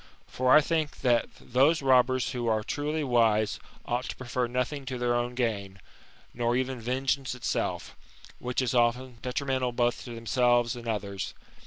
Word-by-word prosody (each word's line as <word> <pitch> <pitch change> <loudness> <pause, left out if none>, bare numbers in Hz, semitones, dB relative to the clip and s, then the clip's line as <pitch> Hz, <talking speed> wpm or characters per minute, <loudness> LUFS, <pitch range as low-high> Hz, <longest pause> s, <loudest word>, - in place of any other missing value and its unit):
For 130 0 0
I 150 - +9
think 155 -1 -2
that 120 -3 +2
those 140 +5 +2
robbers 130 -1 +3
who 120 -2 -3
are 110 -1 +1
truly 150 +5 -2
wise 115 -5 +2 0.3
ought 120 +1 -1
to - - -5
prefer 125 -1 -2
nothing 125 +4 -2
to 130 -1 -3
their 120 0 +1
own 120 0 -1
gain, 100 -6 -2 0.5
nor 120 0 0
even 130 -1 -1
vengeance 130 +2 -1
itself, 125 - -2 0.4
which 125 +1 -1
is 125 - -1
often 120 0 +1
detrimental 130 -1 -1
both 120 0 0
to 120 -2 -7
themselves 120 +1 +2
and 120 -1 -9
others. 100 -3 -3
125 Hz, 160 wpm, -28 LUFS, 120-130 Hz, 0.5 s, I